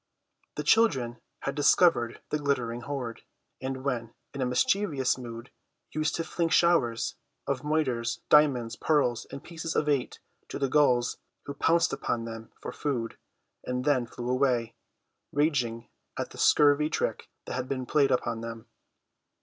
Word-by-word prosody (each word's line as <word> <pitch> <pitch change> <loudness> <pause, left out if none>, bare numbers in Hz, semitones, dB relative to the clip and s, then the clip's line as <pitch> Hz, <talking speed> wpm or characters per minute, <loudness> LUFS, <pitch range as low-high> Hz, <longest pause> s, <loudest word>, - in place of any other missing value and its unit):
The - - -3
children 130 - +3 0.2
had 140 - -2
discovered 145 -4 +3
the 150 - 0
glittering 125 -5 -1
hoard, 125 -3 -5 0.4
and 130 0 -4
when 120 -4 -3 0.2
in 140 - -4
a 130 - +1
mischievous 140 +1 +1
mood 120 -1 -8 0.4
used 155 0 -1
to 165 - -1
fling 165 0 -1
showers 160 -9 +2 0.3
of 135 -2 -1
moidores, 130 -6 0
diamonds, 130 -6 +4
pearls 130 -7 +1
and 140 - -8
pieces 165 -1 -5
of 150 - +1
eight 140 -4 0 0.3
to - - -5
the 135 -2 0
gulls, 125 -4 +3 0.3
who 140 - -5
pounced 165 +4 +2
upon 115 -1 -2
them 115 -1 -8
for - - -6
food, 125 -6 -3 0.4
and 125 0 -3
then 130 -5 +2
flew 120 +1 -7
away, 125 -3 +1 0.6
raging 125 -6 0 0.3
at - - -3
the - - -11
scurvy 150 +1 +5
trick - - -2 0.2
that - - -5
had 130 0 -3
been 130 -2 -2
played 140 0 +3
upon 120 -3 0
them. 115 -1 -7
130 Hz, 150 wpm, -28 LUFS, 120-150 Hz, 0.6 s, scurvy